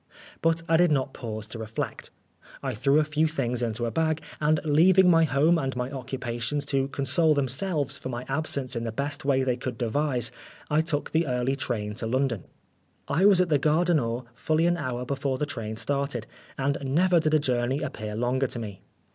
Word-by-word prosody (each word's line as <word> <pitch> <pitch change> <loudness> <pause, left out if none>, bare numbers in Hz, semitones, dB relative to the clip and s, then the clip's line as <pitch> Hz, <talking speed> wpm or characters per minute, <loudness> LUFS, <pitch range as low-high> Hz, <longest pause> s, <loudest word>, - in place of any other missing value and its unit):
But 165 0 +2
I 165 - +4
did 175 -1 +4
not 135 -2 0
pause 110 -3 -6
to 115 - -7
reflect. 110 0 -5 0.5
I - - -2
threw 135 +6 +3
a - - +4
few 150 +1 +1
things 125 -6 -1
into 120 0 -1
a 115 - -2
bag, 160 +1 +1 0.2
and 155 0 +2
leaving 180 +5 +5
my 165 -1 +5
home 155 +4 +3
and 135 -3 -2
my 125 +1 -3
occupations 130 0 -3
to 135 0 +2
console 140 +4 +2
themselves 145 +2 -1
for - - -6
my 120 0 -5
absence 135 -2 -2
in 115 - -2
the 115 - -2
best 140 +4 -4
way 135 -2 +3
they 125 -2 0
could 125 -1 -5
devise, 125 0 0 0.4
I 150 +1 +4
took 155 -2 -2
the 160 0 +1
early 125 +1 0
train 115 -6 -3
to 115 - -2
London. 130 -4 0 0.6
I 165 +7 +2
was 195 -3 +6
at 180 - +1
the 150 -2 +3
Gare 155 +5 +2
du 175 - +3
Nord 120 -4 0
fully 155 +6 +1
an 175 0 +3
hour 125 -6 -3
before 135 0 -1
the 150 - -1
train 110 -6 -5
started, 140 -1 -2 0.3
and 140 +1 0
never 170 +6 +3
did 155 -1 +2
a - - +5
journey 130 +1 0
appear 110 -7 -5
longer 125 +4 +1
to 120 - -6
me. 105 -5 -6
135 Hz, 205 wpm, -26 LUFS, 120-155 Hz, 0.6 s, was